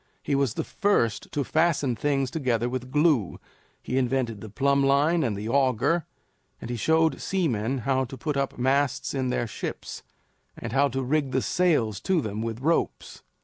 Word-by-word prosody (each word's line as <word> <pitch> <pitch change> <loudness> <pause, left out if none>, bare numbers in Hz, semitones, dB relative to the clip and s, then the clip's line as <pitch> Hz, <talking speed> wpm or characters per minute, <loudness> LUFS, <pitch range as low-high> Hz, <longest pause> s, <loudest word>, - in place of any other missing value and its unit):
He 145 - -1
was 135 -5 +1
the - - -1
first 195 - 0
to 145 - -1
fasten 155 -4 +1
things 135 -1 0
together 125 -6 0
with 125 0 -4
glue; 150 - +2 0.4
he 130 +2 0
invented 125 -4 -1
the 110 - -8
plumb 140 +5 +2
line 145 +5 +3
and 110 -6 -1
the 105 +2 -5
auger; 135 +5 +1 0.5
and 120 - -6
he - - -2
showed 160 +7 +2
seamen 135 - 0
how 130 -1 +1
to 130 +2 -9
put 150 +4 -3
up 140 -1 -1
masts 135 +2 +1
in 130 -2 -1
their 120 -1 0
ships 110 - -6 0.6
and 120 -1 -6
how 140 +1 +4
to 135 0 -3
rig 140 0 0
the 130 - +2
sails 145 - +1
to 185 -2 +1
them 110 -5 -3
with 115 +1 -4
ropes. 165 +4 -1
135 Hz, 180 wpm, -26 LUFS, 120-150 Hz, 0.6 s, how